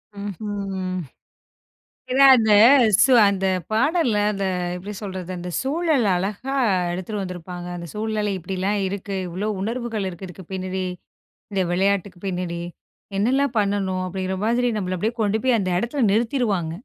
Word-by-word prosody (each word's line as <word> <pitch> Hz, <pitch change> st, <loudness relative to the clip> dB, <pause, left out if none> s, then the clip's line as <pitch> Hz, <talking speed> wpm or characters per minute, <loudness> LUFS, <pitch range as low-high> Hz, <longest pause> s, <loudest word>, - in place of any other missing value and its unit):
ம்ஹ்ம், 205 Hz, 0 st, -5 dB
ம். 185 Hz, 0 st, -2 dB, 1.1 s
ஏனா, 275 Hz, +2 st, +5 dB
அந்த 220 Hz, -2 st, +3 dB, 0.5 s
சு 265 Hz, -, +5 dB, 0.2 s
அந்த 195 Hz, -1 st, 0 dB, 0.3 s
பாடல்ல 260 Hz, -2 st, +2 dB
அந்த 195 Hz, -1 st, -3 dB, 0.3 s
எப்டி 200 Hz, +4 st, -7 dB
சொல்றது? 185 Hz, -3 st, -6 dB
அந்த 180 Hz, 0 st, -6 dB
சூழல் 295 Hz, -4 st, +1 dB
அழகா 205 Hz, +9 st, -3 dB, 0.4 s
எடுத்துட்டு 195 Hz, +3 st, -4 dB
வந்துருப்பாங்க. 180 Hz, -1 st, -7 dB
அந்த 170 Hz, 0 st, -7 dB
சூழ்நிலை 210 Hz, -1 st, -1 dB
இப்டிலாம் 190 Hz, +3 st, -2 dB
இருக்கு. 200 Hz, 0 st, -4 dB
இவ்வளோ 190 Hz, +5 st, -3 dB
உணர்வுகள் 225 Hz, -1 st, -2 dB
இருக்கு 185 Hz, +1 st, -8 dB
இதுக்கு 180 Hz, +1 st, -11 dB
பின்னாடி, 185 Hz, 0 st, -3 dB, 0.7 s
இந்த 190 Hz, -1 st, +1 dB
விளையாட்டுக்கு 195 Hz, -1 st, 0 dB
பின்னாடி 180 Hz, -2 st, -3 dB, 0.6 s
என்னலாம் 255 Hz, +5 st, +1 dB
பண்ணணும்? 195 Hz, -2 st, 0 dB
அப்டிங்கிற 190 Hz, +1 st, -3 dB
மாரி 240 Hz, +2 st, +2 dB
நம்மள 185 Hz, -2 st, -2 dB
அப்டியே 220 Hz, +6 st, -1 dB
கொண்டு 210 Hz, +1 st, +1 dB
போய் 250 Hz, -3 st, +3 dB
அந்த 185 Hz, -2 st, -1 dB
இடத்துல 240 Hz, +6 st, -2 dB
நிறுத்திருவாங்க. 220 Hz, -, 0 dB
200 Hz, 135 wpm, -23 LUFS, 185-225 Hz, 1.1 s, ஏனா